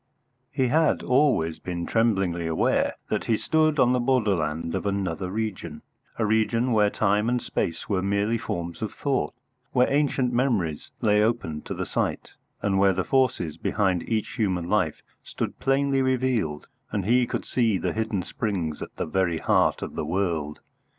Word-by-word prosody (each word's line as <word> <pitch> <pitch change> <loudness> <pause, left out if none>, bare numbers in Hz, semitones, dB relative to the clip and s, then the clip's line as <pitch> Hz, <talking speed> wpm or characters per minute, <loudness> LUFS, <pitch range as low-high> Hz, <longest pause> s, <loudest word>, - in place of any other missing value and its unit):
He 130 -2 0
had 160 +3 +2
always 125 - +2
been 85 -1 -4
tremblingly 95 -7 +1
aware 80 - +1 0.2
that - - 0
he 115 - +2
stood 155 +2 +2
on 125 -2 +4
the 125 - +2
borderland 95 - 0
of - - -2
another 95 -2 -2
region, 95 -7 -4 0.3
a 110 - +1
region 110 +3 +1
where 105 -2 +4
time 105 +2 +1
and 125 0 +1
space 85 -7 -3
were 95 -3 0
merely 100 +4 0
forms 85 -7 -4
of 110 - -2
thought, 140 -3 -1 0.4
where 125 -1 +4
ancient 135 -4 +1
memories 110 - 0
lay 105 -1 +4
open 105 -9 0
to - - -4
the - - -3
sight, - - -2 0.3
and 95 -1 +2
where 95 -1 +5
the 95 0 -1
forces 105 - +1
behind 95 -1 0
each 110 -2 0
human 95 -6 0
life - - 0 0.2
stood - - -5
plainly 135 0 +2
revealed 125 - 0 0.3
and 100 -3 -2
he 120 +3 +3
could - - -3
see 115 -5 +1
the - - -2
hidden 110 -4 -1
springs 90 -10 -3
at - - -7
the - - -2
very 85 0 0
heart - - +2
of - - -6
the - - -3
world. 80 -4 -2
105 Hz, 170 wpm, -25 LUFS, 85-125 Hz, 0.4 s, where